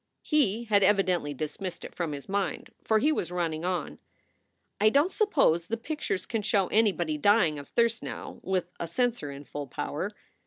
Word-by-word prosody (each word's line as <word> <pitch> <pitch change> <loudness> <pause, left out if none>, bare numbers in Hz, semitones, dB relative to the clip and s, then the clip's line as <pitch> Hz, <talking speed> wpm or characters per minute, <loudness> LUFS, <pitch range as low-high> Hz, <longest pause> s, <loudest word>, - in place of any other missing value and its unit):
He 235 - +2
had 210 -3 +3
evidently 190 -6 +3
dismissed 155 +5 -5
it - - -9
from 170 -3 -2
his 140 -1 -7
mind, 195 -2 -2
for 220 - +3
he 295 +8 +3
was 180 - -1
running 165 -3 -2
on: 180 -4 -2 0.8
"I 215 +1 +6
don 285 +9 +3
t - - -15
suppose 270 - +3
the 230 - -1
pictures 230 - -3
can 225 -2 -2
show 200 -2 +2
anybody 180 -8 +2
dying 175 -5 +4
of 140 - -11
thirst 235 0 +2
now - - -6
r, - - -10
with 185 -2 -1
a 170 - -3
censor 240 - 0
in 140 +1 -8
full 145 0 -6
power. - - -3
190 Hz, 190 wpm, -28 LUFS, 165-225 Hz, 0.8 s, I